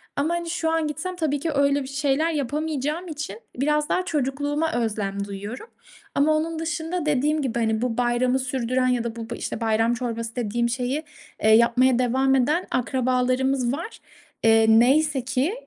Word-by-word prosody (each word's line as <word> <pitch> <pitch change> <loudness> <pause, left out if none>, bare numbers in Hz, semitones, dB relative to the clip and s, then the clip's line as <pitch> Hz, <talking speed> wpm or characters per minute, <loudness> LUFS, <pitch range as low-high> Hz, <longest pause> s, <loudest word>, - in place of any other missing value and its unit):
ama 310 +4 0
hani 340 -1 -4
şu 325 -1 -1
an 325 -2 +1
gitsem 325 +5 -4
tabii 300 -4 -1
ki 325 +2 -2
öyle 280 0 +2
bir - - -8
şeyler 280 +4 0
yapamayacağım 300 +3 -2
için 290 -9 -6 0.2
biraz 300 +2 +1
daha 365 - 0
çocukluğuma 290 +1 -1
özlem 205 -4 -2
duyuyorum 205 - -7 0.5
ama 305 +2 +3
onun 320 +1 -2
dışında 325 +1 -3
dediğim 300 +2 +1
gibi 240 -3 -2
hani 220 0 0
bu 245 -2 -1
bayramı 245 +1 +1
sürdüren 255 -1 0
ya 245 -2 +1
da 235 -1 -4
bu 230 0 -7
bu - - -4
işte - - -5
bayram 225 +1 +2
çorbası 230 -1 -4
dediğim 235 0 -1
şeyi, 255 +5 -2 0.4
eee, 220 - +5
yapmaya 240 +3 +5
devam 265 +2 +2
eden 300 +8 +1
akrabalarımız 255 0 +1
var, 335 +10 -6 0.4
eee, 225 0 +5
neyse 265 +5 +4
ki 260 +8 0
265 Hz, 170 wpm, -24 LUFS, 235-300 Hz, 0.5 s, eee